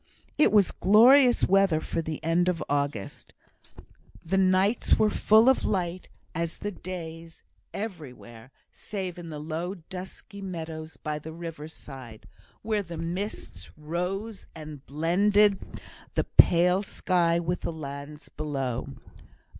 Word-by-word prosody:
It 305 - +4
was 205 -4 +4
glorious 245 +6 +6
weather 195 -4 +4
for 165 - -3
the 160 -1 -5
end 170 +3 +2
of 175 -2 -1
August. 140 -8 -3 0.9
The 180 +4 0
nights 190 +4 +3
were 215 -1 +3
as - - -6
full 220 +3 +5
of 265 - +4
light 180 -2 -2 0.3
as 165 0 -3
the 205 - -4
days 165 -3 -8 0.3
everywhere, 135 - -8 0.2
save 185 -4 -6
in 170 -1 -8
the 155 - -6
low 160 +5 -4
dusky 190 +3 -10
meadows 160 -5 -6
by 150 +2 -4
the 160 +2 -9
river 165 -2 -7
side, 130 -8 -11 0.4
where 215 -1 0
the 170 -3 -8
mists 180 +6 -5
rose 180 +7 -4
and 155 -3 -9
blended 195 +7 +3 0.6
the - - +2
pale 180 +2 +5
sky 175 -4 +1
with 170 +1 -2
the - - -3
lands 145 -1 -8
below. 135 -5 -3
170 Hz, 130 wpm, -27 LUFS, 155-195 Hz, 0.9 s, glorious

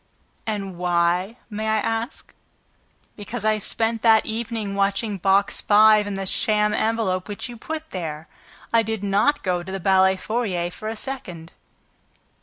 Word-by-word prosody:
"And 195 -4 -4
why, 180 +4 +1
may 215 0 -4
I 220 0 +2
ask?" 225 +5 -3 0.8
"Because 215 +2 -6
I 215 0 +2
spent 225 +2 -1
that 225 -1 +5
evening 220 -2 -3
watching 200 +1 0
Box 195 +2 +2
Five 215 0 +5
and 200 -1 -3
the 195 - -3
sham 210 +2 +1
envelope 215 -5 0
which 205 +3 -5
you 240 - -8
put 315 +6 -6
there. 160 -4 -5 0.5
I 230 - +6
did 220 -2 -3
not 205 +9 +2
go 180 -2 0
to 185 +2 -8
the 195 - -3
ballet 190 0 +4
foyer 190 -6 -2
for 215 +4 -7
a 225 - -4
second." 180 -12 -6
210 Hz, 155 wpm, -23 LUFS, 190-225 Hz, 0.8 s, I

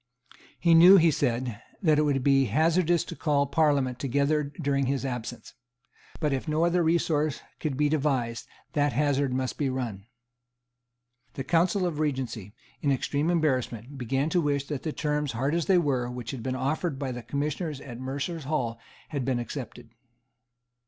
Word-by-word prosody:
He 170 -1 +4
knew, 175 +4 +9
he 165 -2 +5
said, 120 -5 -1 0.2
that 155 -3 +4
it - - +4
would 140 -3 +1
be 135 -1 +4
hazardous 165 - +2
to 170 - -8
call 145 -3 +1
Parliament 140 -6 +1
together 140 +3 +1 0.2
during 140 -3 0
his 135 0 -1
absence. 120 -3 -5 0.7
But, 150 -4 0
if 135 +4 -3
no 155 +2 +2
other 175 +1 +2
resource 160 -3 +1 0.2
could 145 -5 -2
be 150 0 +3
devised, 135 -6 -1 0.3
that 145 -2 +1
hazard 140 -1 +1
must 130 0 -2
be 140 -3 +1
run. 115 -6 -4 1.3
The 135 - -4
Council 175 +5 +2
of 165 -4 -2
Regency, 130 -9 -3 0.3
in 140 - +2
extreme 145 +4 0
embarrassment, 135 -5 -1
began 135 +5 -1
to 175 - +3
wish 140 -2 0
that 145 -3 -3
the 155 - -3
terms, 150 -3 -1
hard 135 +6 -1
as 170 -1 0
they 190 - +5
were, 135 -7 +1
which 125 -1 -6
had 130 -4 -6
been 130 +2 -2
offered 140 +4 -1
by 135 -2 -3
the 120 0 -5
Commissioners 145 - -3
at 120 -4 -9
Mercers' 140 +4 -4
Hall 125 -6 -2 0.3
had 140 -3 -2
been 130 -1 0
accepted. 120 -1 -7
140 Hz, 170 wpm, -27 LUFS, 130-155 Hz, 1.3 s, knew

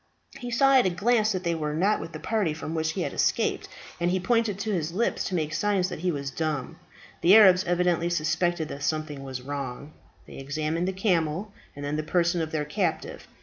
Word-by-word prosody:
He 245 -2 -6
saw 270 +3 +4
at 245 - +3
a - - +3
glance 215 +4 +2
that 185 -2 -2
they 170 -1 0
were 150 -2 -3
not 195 +6 +2
with 165 - -7
the 155 - -7
party 205 -8 -1
from 160 0 -6
which 160 -1 -1
he - - -3
had - - -4
escaped, - - 0 0.3
and 175 0 +1
he 185 +1 +1
pointed 230 0 +1
to 215 +2 -3
his 165 -3 -2
lips 230 +6 0
to 185 - -2
make 155 -2 -1
signs 190 +1 +1
that - - -6
he 180 +2 -1
was 140 -4 -3
dumb. 155 -5 -3 0.4
The 185 +4 +7
Arabs 190 -4 +7
evidently 175 -1 +1
suspected 165 0 0
that 140 - -7
something 155 -2 -2
was 130 -2 -6
wrong. 140 +1 -6 0.3
They - - -12
examined 155 +5 -2
the - - 0
camel, 185 0 -1 0.2
and 145 0 -6
then 145 +1 -2
the - - 0
person 170 +2 +1
of 160 -1 -3
their 150 -2 -1
captive. 200 - -3
170 Hz, 220 wpm, -26 LUFS, 155-190 Hz, 0.4 s, The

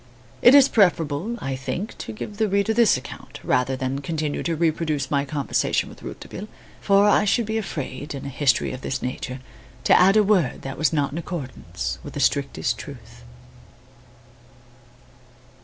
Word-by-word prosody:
It 245 +3 +8
is 280 -1 +8
preferable, 175 - +2
I 135 -1 -2
think, 130 +10 -4
to - - -6
give 205 - -7
the 220 0 +2
reader 200 +3 +1
this 230 - +4
account, 130 - -10
rather 125 +1 +1
than 130 +1 -3
continue 155 0 -2
to 170 - -1
reproduce 155 -3 0
my 140 -1 +1
conversation 145 -1 0
with - - -14
Rouletabille; 210 - -8 0.3
for 200 0 +4
I 210 - +4
should 225 +3 +2
be 220 +1 -1
afraid, 145 -7 -5
in 135 - -7
a - - -4
history 140 -1 +1
of 130 - -7
this 130 -1 -3
nature, 130 +1 -4 0.4
to - - +4
add 195 +3 +6
a 215 - +6
word 200 -4 +1
that 135 0 -6
was 155 - +2
not 145 -3 0
in 155 - -4
accordance 145 - -5
with - - -9
the - - -3
strictest - - 0
truth. - - -11
155 Hz, 170 wpm, -23 LUFS, 135-200 Hz, 0.4 s, It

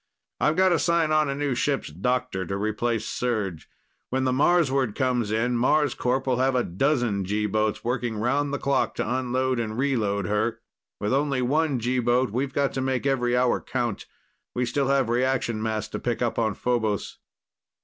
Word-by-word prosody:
"I've 150 - +2
got 190 +1 +4
to 175 - +2
sign 170 -2 +2
on 155 -2 +3
a 140 - -1
new 145 -1 -1
ship's 135 - -1
doctor 110 +4 -1
to 100 - -2
replace 110 +2 -1
Serj. 105 -10 -2 0.4
When 130 +1 0
the 130 - +1
Marsward 135 -5 +2
comes 125 -4 0
in, 115 +3 0
Marscorp 130 0 +1
will 130 -2 +1
have 130 0 +2
a 125 - +2
dozen 120 - 0
G 105 +3 -1
boats 110 +1 0
working 120 -2 -2
round 140 +6 0
the 145 - -1
clock 140 -1 0
to - - -2
unload 130 0 0
and 110 -1 -3
reload 110 -8 0
her. 105 +4 0 0.4
With 105 +4 -1
only 135 -2 +1
one 145 +1 +1
G 125 +2 0
boat, 120 0 +2
we've 130 +4 -1
got 140 0 0
to 135 - -2
make 130 0 -1
every 125 -3 +1
hour 125 0 +2
count. 120 -5 -3 0.5
We 125 - +1
still 135 +2 0
have 135 -2 +2
reaction 120 -2 0
mass 110 -1 -2
to - - -4
pick 120 0 -1
up 120 - -1
on 110 -3 0
Phobos." 110 -5 -1
125 Hz, 185 wpm, -25 LUFS, 110-135 Hz, 0.5 s, got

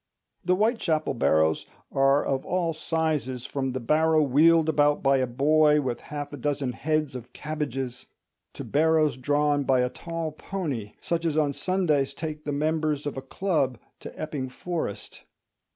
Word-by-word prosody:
The 180 0 +2
Whitechapel 190 - +1
barrows 80 -9 +2 0.2
are 135 +1 +3
of 135 -1 -1
all 175 -2 -1
sizes, 155 -6 -2
from 135 -2 -2
the 130 - -2
barrow 155 +5 +3
wheeled 160 +4 +4
about 150 -1 +2
by 135 0 +4
a 130 -1 +1
boy 150 +4 +4
with 130 -4 -2
half 145 -1 -7
a - - -5
dozen 140 -1 -1
heads 155 +4 -1
of 125 -1 -9
cabbages 135 -5 -4 0.5
to - - -7
barrows 155 -1 +2
drawn 145 +2 +1
by 130 -1 +3
a 125 - +1
tall 165 -2 -4
pony, 150 - -5
such 170 -1 -1
as 160 -2 0
on 145 -2 +2
Sundays 150 -7 0
take 155 -1 -6
the 145 - -2
members 150 0 0
of 145 - -3
a 135 - -4
club 140 - -1 0.2
to - - -10
Epping 145 -4 -4
Forest. 160 - -5
150 Hz, 160 wpm, -26 LUFS, 135-160 Hz, 0.5 s, wheeled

